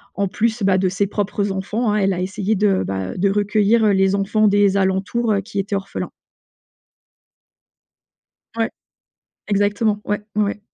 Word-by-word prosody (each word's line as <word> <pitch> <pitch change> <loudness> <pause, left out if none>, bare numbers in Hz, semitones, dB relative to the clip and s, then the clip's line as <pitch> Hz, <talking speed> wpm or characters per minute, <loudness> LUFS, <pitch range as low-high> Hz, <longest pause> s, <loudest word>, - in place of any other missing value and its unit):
en 200 +1 0
plus, 225 +4 -1
bah, 190 -1 +3
de 185 0 +1
ses 200 +2 0
propres 205 0 -2
enfants, 210 +4 -1
hein, - - +1
elle 195 -2 +2
a 180 - -3
essayé 195 +3 -1
de, 195 -1 +2
bah, 95 -1 -3
heu, - - -10
de 200 +2 +2
recueillir, 210 +2 +2
heu, 210 - +4
les 190 0 +3
enfants 200 +2 +2
des 200 -1 +3
alentours, 195 +4 0
heu, 200 - +1
qui 200 +1 -9
étaient 200 +1 -1
orphelins. 195 0 -4 2.5
Ouais, 225 +1 0 0.8
exactement. 205 +1 +1
Ouais, 205 0 -1
mouais. 210 0 0
200 Hz, 160 wpm, -20 LUFS, 195-210 Hz, 2.5 s, heu